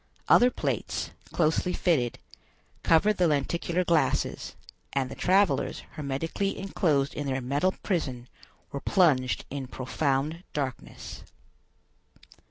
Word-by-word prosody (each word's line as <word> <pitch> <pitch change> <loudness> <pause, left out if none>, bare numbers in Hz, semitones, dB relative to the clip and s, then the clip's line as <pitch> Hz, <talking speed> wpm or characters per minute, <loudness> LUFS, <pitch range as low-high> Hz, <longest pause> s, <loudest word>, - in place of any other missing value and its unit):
Other 245 - +7
plates, - - -2 0.2
closely 170 +2 +1
fitted, 135 -10 +1 0.6
covered 205 +6 +4
the 180 - +4
lenticular 170 +4 0
glasses, 170 -3 0 0.4
and 135 -2 0
the - - -6
travelers, 195 +2 +2
hermetically 160 +7 -2
enclosed 155 -8 +1
in 145 - -4
their 135 -1 0
metal 145 +9 0
prison, 130 - -2 0.4
were 140 - -4
plunged 145 -10 +2
in 135 -2 -4
profound 140 +5 -1
darkness. 135 -4 -5
150 Hz, 105 wpm, -28 LUFS, 135-180 Hz, 0.6 s, Other